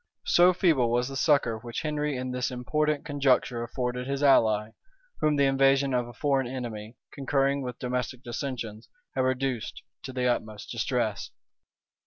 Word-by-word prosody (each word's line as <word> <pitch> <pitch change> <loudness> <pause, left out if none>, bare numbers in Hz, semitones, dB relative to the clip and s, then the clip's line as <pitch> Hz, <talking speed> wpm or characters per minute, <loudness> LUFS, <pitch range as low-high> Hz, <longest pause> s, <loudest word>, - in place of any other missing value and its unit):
So 175 +1 +6
feeble 160 -10 +2
was 120 +2 +1
the 135 - -6
succor 135 -7 +2
which 120 +6 -5
Henry 150 -2 -1
in 130 0 -3
this 125 0 -1
important 150 +4 -1
conjuncture 135 -4 +1
afforded 125 +1 -3
his 140 +1 -2
ally, 110 -6 +4 0.5
whom 150 -1 +2
the 140 -1 +3
invasion 135 0 +3
of 125 -1 0
a 120 - -10
foreign 135 0 0
enemy, 115 -3 -6 0.2
concurring 140 0 +1
with 125 -2 -5
domestic 125 0 -3
dissensions, 120 -3 -5 0.2
had 130 - 0
reduced 130 -2 -2 0.2
to 135 - -7
the 125 -1 -2
utmost 110 -4 -2
distress. - - -1
130 Hz, 155 wpm, -27 LUFS, 120-140 Hz, 0.5 s, So